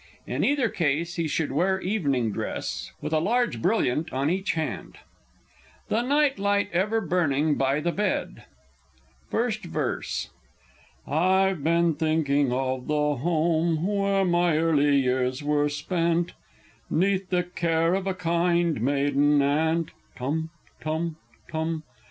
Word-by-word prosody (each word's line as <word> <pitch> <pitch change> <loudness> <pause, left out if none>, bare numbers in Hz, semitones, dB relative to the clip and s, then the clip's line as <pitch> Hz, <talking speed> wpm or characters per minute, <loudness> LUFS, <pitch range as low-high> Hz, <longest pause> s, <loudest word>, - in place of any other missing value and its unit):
In - - -2
either 280 -4 +2
case 170 -1 -1
he 165 -1 0
should 155 -1 -1
wear 190 +7 +1
evening 140 - 0
dress, - - -4
with 155 - -3
a 155 - +3
large 235 +8 0
brilliant 165 - +1
on 135 +4 0
each 190 -1 -1
hand. 160 -1 -4 0.9
THE 225 - +1
NIGHT 280 +1 +2
LIGHT 200 0 +1
EVER 210 +6 +1
BURNING 155 -5 +1
BY 135 +1 +1
THE 175 +2 0
BED. 205 +2 -2 0.8
First - - -1
Verse. - - -3 0.7
I've 185 +2 +2
been 170 +1 +3
thinking 145 -3 +1
of 130 0 -2
the 150 -1 +1
home 165 +2 +1
where 200 -1 +1
my 175 -2 +2
early 150 -3 +3
years 130 0 0
were 145 0 +1
spent, 170 +3 -1 0.6
'Neath 190 +2 +1
the 180 -1 +1
care 165 -1 0
of 195 0 -1
a 190 - -1
kind 170 -4 +1
maiden 145 +2 +2
aunt, 160 +3 +1 0.2
(Tum 155 +6 -2 0.3
tum 160 +1 -2 0.3
tum!) 160 0 -3
165 Hz, 130 wpm, -26 LUFS, 145-185 Hz, 0.9 s, a